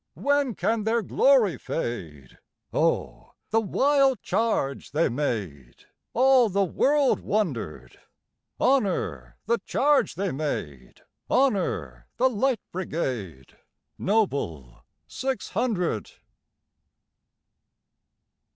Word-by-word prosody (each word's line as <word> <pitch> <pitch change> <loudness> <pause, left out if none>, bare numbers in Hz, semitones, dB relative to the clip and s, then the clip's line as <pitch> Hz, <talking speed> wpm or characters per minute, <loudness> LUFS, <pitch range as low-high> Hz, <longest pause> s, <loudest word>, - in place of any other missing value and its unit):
When 285 -5 +1
can 225 -1 0
their 225 +1 +1
glory 250 - +3
fade?O 80 - -4 0.2
the 225 +1 +3
wild 270 +4 +2
charge 215 -15 -1
they 160 +3 +2
made! 100 - -4 0.3
All 255 -2 +5
the 200 +1 +1
world 275 - +2
wonder'd. 115 - -3 0.6
Honor 175 - 0
the 235 +2 +1
charge 290 +1 +1
they 195 +2 -1
made! 75 - -5 0.3
Honor 180 - 0
the 260 +1 +3
Light 245 0 0
Brigade, 125 - -4 0.4
Noble 140 - -1 0.2
six 265 0 -4
hundred! 180 - -1
190 Hz, 85 wpm, -26 LUFS, -, 0.6 s, All